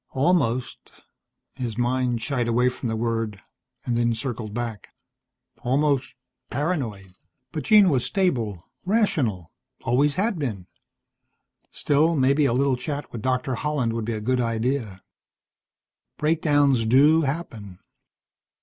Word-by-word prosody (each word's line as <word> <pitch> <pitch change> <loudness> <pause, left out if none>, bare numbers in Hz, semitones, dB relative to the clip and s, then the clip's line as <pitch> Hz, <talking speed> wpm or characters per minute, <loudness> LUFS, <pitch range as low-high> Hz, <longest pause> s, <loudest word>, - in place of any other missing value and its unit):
Almost 130 -4 -1 0.5
His 120 -4 -5
mind 120 -1 0
shied 125 -4 -1
away 120 +2 +3
from 125 -1 -5
the 110 - -1
word, 115 -2 -2 0.5
and 120 -1 +1
circled 115 -3 -4
back. 115 -3 -5 0.7
Almost 140 +1 0 0.3
paranoid. 120 - -3 0.4
But 155 -5 -5
Jean 210 -2 +6
was 135 -7 +2
stable, 115 - -1 0.2
rational, 145 - 0 0.3
always 140 +4 +2
had 200 -1 0
been. 110 -11 -3 1.0
Still, 155 +3 +2
maybe 140 +1 +3
a 120 - +2
little 135 +1 +2
chat 145 +3 -5
with 115 - -6
Doctor 130 +2 -1
Holland 125 -3 -1
would 115 -1 -3
be 115 - -2
a 110 - -4
good 125 +3 +1
idea. 115 -4 -2 1.1
Breakdowns 145 -6 +2
do 145 +7 +5
happen. 130 - -4
125 Hz, 120 wpm, -24 LUFS, 115-145 Hz, 1.1 s, Jean